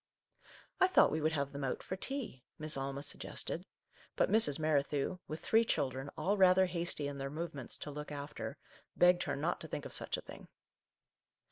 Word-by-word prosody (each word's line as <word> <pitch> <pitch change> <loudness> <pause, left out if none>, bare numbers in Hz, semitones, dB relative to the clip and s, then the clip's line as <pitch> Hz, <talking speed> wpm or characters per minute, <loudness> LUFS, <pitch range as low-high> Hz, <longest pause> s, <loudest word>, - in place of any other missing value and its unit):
" - - -23
I 370 - +8
thought 370 - +5
we 155 - -1
would 155 +1 +1
have 140 -2 -1
them 140 0 -5
out 130 - -2
for 185 - -4
tea," 225 - -3
Miss 155 0 -1
Alma 135 +1 -3
suggested, 170 +4 -3 0.5
but - - +2
Mrs. 205 -10 +5
Merri 155 -2 +3
thew, 145 +5 -2
with 155 +1 -5
three 225 +1 +4
children, 135 - -1
all 200 +2 +1
rather 190 0 +6
hasty 170 -4 0
in 140 -1 -5
their 135 0 -3
movements, 150 -4 -4
to 150 - -6
look 150 +1 -6
after, 145 0 -5 0.4
begged 175 0 +5
her - - -1
not 160 +5 -1
to 160 - -6
think 145 - -5
of - - -7
such - - -2
a - - -6
thing. - - -11
155 Hz, 200 wpm, -34 LUFS, 140-180 Hz, 0.5 s, I